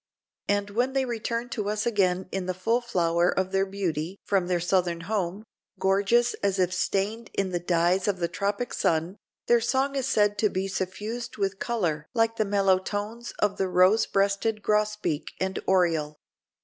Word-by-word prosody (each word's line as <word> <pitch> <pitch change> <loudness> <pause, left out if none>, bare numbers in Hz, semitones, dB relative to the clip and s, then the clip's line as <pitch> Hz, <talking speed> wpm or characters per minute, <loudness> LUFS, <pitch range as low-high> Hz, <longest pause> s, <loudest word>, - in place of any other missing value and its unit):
And 205 0 0
when 245 +5 0
they 270 -1 +1
return 235 0 -3
to 210 -4 -3
us 210 0 -1
again 190 -5 +1
in 190 -2 -3
the 185 - -2
full 225 +7 +1
flower 175 -6 +1
of 190 0 -1
their 195 0 +1
beauty 185 -2 -3
from 190 -3 +1
their 180 -1 +1
southern 175 -1 0
home, 195 +1 -2 0.3
gorgeous 200 +6 +2
as 200 -1 +1
if 185 -1 +1
stained 200 +4 -1
in 195 -1 0
the 175 - -1
dyes 175 +2 +1
of 200 -2 +1
the 170 -1 0
tropic 200 +6 -2
sun, 165 +4 0 0.3
their 240 -1 +4
song 265 +4 +1
is 265 -2 -1
said 205 -5 +2
to 215 - +3
be 190 0 -2
suffused 210 +6 -4
with 195 -1 -1
color 170 -11 -1
like 225 0 +2
the 215 - +2
mellow 195 -2 +3
tones 210 +5 -5
of 205 -1 0
the 190 - 0
rose 185 +4 +4
breasted 200 +2 0
grosbeak 210 -7 0
and 190 0 -1
oriole. 165 -5 +2
195 Hz, 175 wpm, -26 LUFS, 185-220 Hz, 0.3 s, their